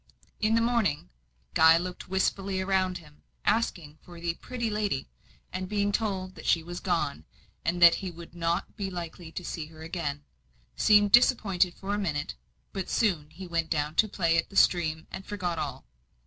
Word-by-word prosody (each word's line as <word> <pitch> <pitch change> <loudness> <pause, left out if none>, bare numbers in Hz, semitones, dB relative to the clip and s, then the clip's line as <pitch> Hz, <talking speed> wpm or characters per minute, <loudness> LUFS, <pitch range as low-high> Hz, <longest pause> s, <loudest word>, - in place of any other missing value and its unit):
In 220 +1 +2
the 230 - +3
morning, 225 - 0 0.4
Guy 160 +1 +7
looked 180 +1 -5
wistfully 190 0 0
around 190 -1 +1
him, 150 -3 -17 0.2
asking 165 -9 0
for 175 -1 -12
the 170 0 -1
"pretty 240 +6 -4
lady;" 205 - -2 0.4
and 185 0 -4
being 205 -1 +1
told 195 -4 -1
that 160 - -9
she 165 - +3
was 175 +1 -6
gone, 150 - -1 0.4
and 175 +1 0
that 170 -1 +10
he 190 - -3
would 170 -1 -11
not 170 +1 -2
be 200 -3 -3
likely 170 -2 -7
to 180 - -6
see 160 -2 -4
her 160 0 -12
again, 160 -4 -4 0.5
seemed 205 - +5
disappointed 195 -7 +4
for 200 +1 -4
a 205 - 0
minute; 150 -7 -2 0.4
but 195 -2 -4
soon 175 -10 +1
he 185 +4 -9
went 165 -2 -1
down 150 -1 0
to 220 - +5
play 165 -4 +2
at - - -3
the 195 - -14
stream, 160 -4 +3
and 190 - -6
forgot 180 -5 -2
all. - - -4
180 Hz, 180 wpm, -28 LUFS, 165-195 Hz, 0.5 s, that